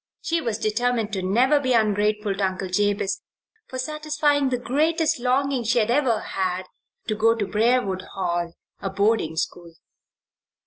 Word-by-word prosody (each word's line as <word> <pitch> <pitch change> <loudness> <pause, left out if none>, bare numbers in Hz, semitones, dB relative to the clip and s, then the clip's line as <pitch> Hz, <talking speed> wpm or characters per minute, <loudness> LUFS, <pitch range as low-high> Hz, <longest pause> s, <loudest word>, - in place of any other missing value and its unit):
She 335 0 0
was 230 -7 -2
determined 225 0 0
to 190 - -1
never 245 +10 +3
be 260 -2 0
ungrateful 210 -2 +1
to 195 +1 -3
Uncle 185 0 -2
Jabez 205 +1 0 0.5
for 260 - -7
satisfying 300 0 0
the 250 - 0
greatest 315 +5 +1
longing 260 +1 +1
she 230 +2 +1
had 230 0 +2
ever 250 -4 +2
had 185 -1 -2 0.4
to 215 - 0
go 225 +2 +3
to 215 -3 -1
Briarwood 210 -1 +1
Hall, 175 -2 -1 0.3
a 195 - -3
boarding 200 -4 +1
school. 170 +1 -4
220 Hz, 150 wpm, -24 LUFS, 195-260 Hz, 0.5 s, never